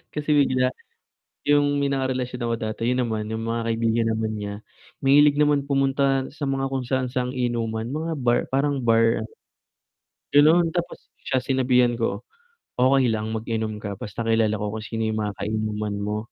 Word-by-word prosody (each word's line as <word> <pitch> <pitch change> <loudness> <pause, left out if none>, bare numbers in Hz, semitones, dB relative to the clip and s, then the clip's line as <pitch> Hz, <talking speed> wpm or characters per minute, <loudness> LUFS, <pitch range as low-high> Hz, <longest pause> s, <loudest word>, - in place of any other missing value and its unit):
kasi 150 0 -1
bigla, 130 -3 +3 0.8
'yong 145 0 +3
may 140 - +1
nakarelasyon 130 -2 -2
ako 115 - 0
dati. 110 +2 -2
'Yon 125 -1 +1
naman, 110 -1 -3
'yong 110 0 -3
mga 115 0 -1
kaibigan 115 0 +1
naman 110 0 -2
niya, 100 -1 -5 0.5
mahilig 145 +1 +5
naman 145 -1 +3
pumunta 135 -1 +2
sa 150 - -4
mga 135 0 -1
kung 135 -1 -2
saan-saang 125 0 -1
inuman, 115 -3 -2
mga 160 +2 -2
bar, 120 -2 +2
parang 140 0 0
bar 115 -1 +3
ano 110 - -8 1.0
gano'n. 160 +4 +5
Tapos, 175 -1 -4
siya 130 - 0
sinabihan 125 -2 +2
ko, 115 - -1 0.6
"Okey 130 0 +4
lang, 110 0 -2
mag-inom 110 -1 -3
ka 100 -2 -5
basta 115 +2 -5
kilala 110 -1 +2
ko 105 0 -3
kung 110 - -4
sino 115 0 -3
'yong 110 - -2
mga 105 -1 -2
kainuman 105 0 -2
mo." 105 +1 -2
125 Hz, 165 wpm, -24 LUFS, 110-135 Hz, 1.0 s, mahilig